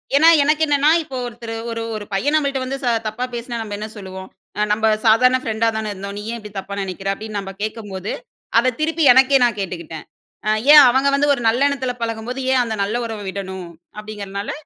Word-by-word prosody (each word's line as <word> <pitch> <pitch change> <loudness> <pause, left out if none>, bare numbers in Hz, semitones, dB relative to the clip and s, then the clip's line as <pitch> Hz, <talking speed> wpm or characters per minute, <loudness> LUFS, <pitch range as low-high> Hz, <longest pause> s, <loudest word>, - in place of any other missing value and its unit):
ஏன்னா 310 +3 +6 0.2
எனக்கு 305 +2 +1
என்னென்னா, 290 0 +3
இப்போ 270 -4 -7
ஒருத்தரு 235 -1 -7 0.2
ஒரு 230 0 -4
ஒரு 210 -1 -6
பையன் 280 +10 +1
நம்மள்ட்ட 280 -3 +1
வந்து 270 +1 -3 0.3
தப்பா 215 +4 -4
பேசுனா 240 0 -5
நம்ம 210 -2 -5
என்ன 210 +1 -5
சொல்லுவோம்? 190 -1 -9 0.4
"நம்ப 220 +1 +1 0.2
சாதாரண 250 +4 +5
ஃப்ரெண்டா 225 0 0
தானே 220 -1 -3
இருந்தோம். 200 +1 -7
நீ - - -5
ஏன் 235 - -5
இப்டி 210 -1 -11
தப்பா 200 +1 -7
நெனைக்கிற" 195 0 -4
அப்டீன்னு 215 +1 -7
நம்ப 195 -1 -7
கேக்கும்போது, 205 -3 -5 0.5
அதை 255 +2 +2
திருப்பி 320 +1 0
எனக்கே 265 +2 +5
நான் 235 -4 -1
கேட்டுக்குட்டேன். 170 -4 -6 0.7
ஏன் 300 -1 +11
அவங்க 265 +3 +2
வந்து 290 +1 +2
ஒரு 260 - -3
நல்லெண்ணத்துல 260 +2 +1
பழகும்போது, 230 +3 -4
ஏன் 255 - +4
அந்த 225 -2 -3
நல்ல 210 +4 -1
உறவ 220 -2 -6
விடணும்? 190 -2 -6 0.3
அப்டீங்கிறனால 205 -1 -6
225 Hz, 185 wpm, -20 LUFS, 200-260 Hz, 0.7 s, ஏன்